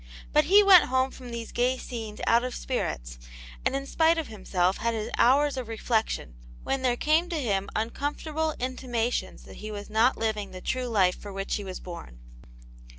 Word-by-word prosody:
But 300 0 +5
he 400 +6 +7
went 385 -3 +8
home 260 +1 +1
from 250 -2 -10
these 235 -1 -6
gay 250 +2 +1
scenes 225 -4 -7
out 235 +1 +4
of 255 -1 -4
spirits, - - -3 0.4
and - - +1
in 275 0 -2
spite 325 +3 +3
of 320 -5 -3
himself 190 -3 0
had 230 +1 -1
his 215 -1 -4
hours 280 +3 +4
of 250 -3 -4
reflection, 225 - -1 0.3
when 270 - -1
there 245 -2 +1
came 320 +6 +2
to 335 -3 -2
him 200 -7 -1
uncomfortable 295 +7 -2
intimations 250 -2 -2
that - - -12
he 215 - -7
was 205 0 -7
not 225 +4 +3
living 215 -3 -2
the 185 - -9
true 255 +6 -2
life 190 -6 +3
for 205 - -8
which 195 0 -4
he 205 - -6
was 185 -1 -6
born. 170 - -9
240 Hz, 190 wpm, -27 LUFS, 210-270 Hz, 0.4 s, went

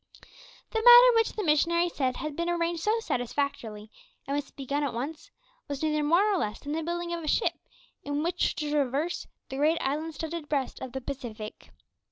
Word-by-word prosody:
The 445 - 0
matter 485 0 +10
which 455 -1 +2
the 425 - -3
missionary 340 +2 +3
said 260 -7 -1
had 305 -1 -4
been 340 +2 -1
arranged 340 -1 0
so 430 +5 +2
satisfactorily, 245 - -3 0.3
and 275 - -2
was 290 -1 -1
to - - -21
be 275 - -8
begun 285 +3 -1
at 275 -5 -2
once, 300 +6 -5 0.4
was 285 +1 -4
neither 305 -1 +1
more 335 +6 +4
nor 415 -3 +2
less 210 -7 -2
than 290 - -7
the 320 +2 -1
building 345 +1 -3
of 340 -1 -4
a - - -5
ship, - - +2 0.5
in 290 +1 -2
which 345 +2 0
to 300 -1 -3
traverse 295 +3 0 0.2
the 265 - -5
great 310 +4 +3
island 305 +3 -2
studded 320 0 -5
breast 275 -3 -1
of 260 - -6
the 265 - -4
Pacific. 235 -5 -7
300 Hz, 205 wpm, -28 LUFS, 275-340 Hz, 0.5 s, matter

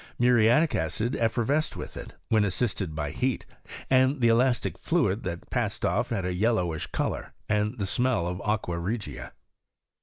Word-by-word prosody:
Muriatic 120 +5 +4
acid 120 +4 -1
effervesced 120 +7 0
with - - -7
it, - - -8
when 110 -2 +4
assisted 95 -4 -1
by 75 -2 -2
heat, 130 -1 -1 0.4
and 130 +2 +3
the 120 -2 +4
elastic 120 +2 +2
fluid 115 - +1
that 85 -1 -5
passed - - -1
off - - +1
had 100 -5 -2
a 90 - -1
yel 110 +6 +2
lowish 85 -6 -2
colour, - - -2
and 105 +3 0
the 100 - -1
smell 120 -2 +1
of 90 +2 -3
aqua 100 -5 -1
regia. 90 - -4
110 Hz, 160 wpm, -27 LUFS, 95-125 Hz, 0.4 s, Muriatic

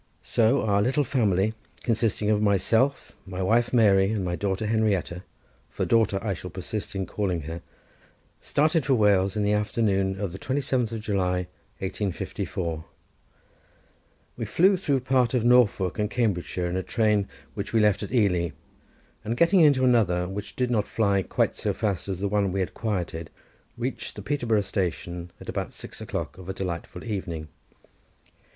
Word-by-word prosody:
So 120 +4 +2
our 100 -2 +2
little 135 +7 +2
family, 110 -5 +1 0.3
consisting 110 -2 +1
of 105 -1 +2
myself, 110 +7 +2 0.2
my 95 0 -3
wife 115 +5 +2
Mary, 100 -5 +5
and 105 -4 -1
my 90 -1 -1
daughter 100 +2 -1
Henrietta, 105 -5 0 0.5
for - - -2
daughter 110 -4 +3
I 105 -3 0
shall 90 +1 -7
persist 100 +4 -5
in 95 -1 -1
calling 90 -2 -2
her, 80 +3 -6 0.8
started 155 +1 +2
for 135 0 +3
Wales 100 -3 +3
in 105 - 0
the 105 +1 +2
afternoon 100 -2 +1
of 100 -4 -2
the 95 - -8
27th 130 -4 -1
July, 90 -4 0 0.4
1854. 95 -4 -3 1.5
We - - -3
flew 190 +3 +4
through 145 -8 0
part 130 -1 +2
of 120 - +1
Norfolk 115 -6 +3
and 105 0 +1
Cambridgeshire 95 -7 -1
in 90 +1 -1
a - - 0
train 105 -1 +1 0.2
which - - -5
we 115 - +3
left 105 -2 +3
at 105 - -5
Ely, 90 - +2 0.7
and 115 +3 -2
getting 170 +5 +5
into 145 -5 +5
another, 95 -8 +3
which 100 +2 -6
did 125 -1 0
not 105 -4 +1
fly 100 -3 +2
quite - - 0
so - - -1
fast 100 -4 -2
as 95 -2 -2
the 100 +3 -1
one 100 -1 +1
we 95 +1 -1
had 95 - -3
quitted, 90 -7 -3 0.5
reached - - -4
the - - -8
Peterborough 120 -7 +1
station 90 -3 -3
at - - -12
about - - -3
six - - -10
o'clock 90 - -4
of 95 0 -10
a 95 - -3
delightful 90 -3 -5
evening. 90 -8 -4
105 Hz, 165 wpm, -26 LUFS, 95-115 Hz, 1.5 s, Mary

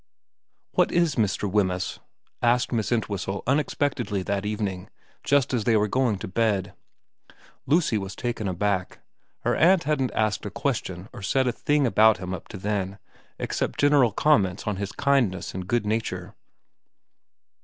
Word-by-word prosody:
' - - -53
What - - +4
is 170 -3 +2
Mr. 105 -2 0
Wemyss? 95 -3 0 0.2
' - - -45
asked 125 0 0
Miss 115 -2 -1
Entwhistle 100 -4 -2
unexpectedly 130 -7 0
that 100 +1 -2
evening, 100 -4 -3 0.3
just 140 -2 +2
as 120 -4 +1
they 115 -2 +4
were 105 0 +2
going 120 -1 +1
to - - -6
bed. 100 -2 0 0.9
Lucy 145 -6 +2
was 95 -1 -6
taken 115 -3 -3
aback. 95 0 -1 0.4
Her - - +1
aunt 180 +1 +4
hadn't 140 -3 0
asked 110 -1 0
a 105 - -4
question 100 -6 -3
or - - -9
said 130 +7 +1
a 125 - +2
thing 145 +3 +1
about 110 -3 +5
him 90 0 -5
up 90 - -7
to 105 - -8
then, 100 -1 -2 0.4
except - - -3
general 145 -5 +4
comments 100 -7 +2
on 105 -3 -2
his 100 -1 -4
kindness 130 -10 +1
and 90 -1 -5
good 120 +1 0
nature. 110 +2 -2
105 Hz, 160 wpm, -25 LUFS, 95-130 Hz, 0.9 s, about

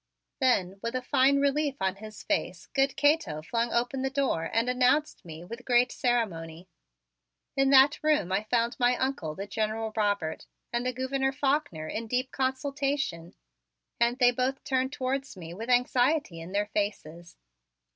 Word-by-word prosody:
Then, 195 -8 +1
with 230 +2 -3
a 255 - -2
fine 270 +3 +3
relief 280 0 +1
on 190 0 -1
his 215 0 -10
face, 240 - -2
good 275 0 +1
Cato 290 - +2
flung 235 +6 -1
open 245 +3 0
the 265 - 0
door 265 -12 -1
and 230 +2 +1
announced 250 +4 +2
me 165 -1 -9
with 230 +7 -9
great 245 0 +3
ceremony. 180 -9 -2 0.9
In 270 0 +3
that 275 +1 +6
room 300 - +2
I 195 +2 +2
found 235 -1 +1
my 245 0 +3
Uncle, 260 - -2
the 195 - -5
General 220 +1 -2
Robert, 205 -7 -1 0.3
and 240 +1 0
the - - +1
Gouverneur 265 +1 -1
Faulkner 270 - -1
in 225 +7 -4
deep 250 +3 -1
consultation 270 - -2 0.6
and 235 +1 +2
they 245 -2 +5
both 255 +2 -2
turned 260 0 0
towards 270 -4 -3
me 170 -2 -8
with 225 +6 -7
anxiety 250 - +2
in 170 +3 -9
their 205 +1 0
faces. 175 -5 -4
245 Hz, 160 wpm, -28 LUFS, 200-270 Hz, 0.9 s, that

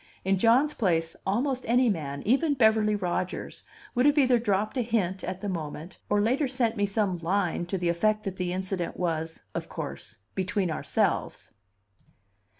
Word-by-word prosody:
In 190 0 +2
John's 250 +8 +4
place 165 -6 0
almost 255 +6 0
any 245 +2 +4
man, 145 -9 -2
even 280 +7 +2
Beverly 220 -3 +4
Rodgers, 185 -2 -3 0.3
would 250 +2 +3
have 290 +1 +3
either 255 -4 +5
dropped 210 0 0
a - - +2
hint 205 -6 -1
at 185 +1 -4
the 205 - -3
moment, 165 -1 -5
or 205 - +3
later 255 +7 +2
sent 245 -3 0
me 205 -2 +1
some 195 -2 0
line 175 0 0
to 190 - -2
the 175 -1 0
effect 215 +5 +1
that 190 -2 -4
the 180 -1 -2
incident 185 -1 -3
was, 160 -2 -2
of - - -4
course, 110 - -6 0.2
"between 190 -1 -1
ourselves." - - -1
200 Hz, 165 wpm, -27 LUFS, 180-230 Hz, 0.3 s, either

